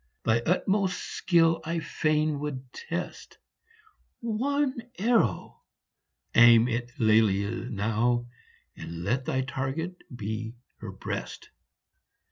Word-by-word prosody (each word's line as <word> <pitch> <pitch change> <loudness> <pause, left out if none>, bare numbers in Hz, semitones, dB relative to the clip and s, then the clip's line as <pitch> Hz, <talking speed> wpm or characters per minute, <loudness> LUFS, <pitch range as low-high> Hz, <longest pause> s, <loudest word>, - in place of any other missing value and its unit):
Thy 110 +1 +3
utmost 190 +1 +1
skill 165 -2 +2
I 165 +1 -2
fain 155 -1 0
would 135 -3 -6
test; 170 +2 -6 0.8
One 260 +3 -1 0.2
arrow 220 - +1 0.7
aim 120 0 +7
at 120 +1 -4
Lelia 110 +1 +2
now, 115 +4 0 0.5
And 85 0 -7
let 130 +7 0
thy 130 0 0
target 135 +7 -4 0.2
be 110 +1 -4 0.2
her - - -7
breast - - -6
130 Hz, 95 wpm, -27 LUFS, 115-170 Hz, 0.8 s, aim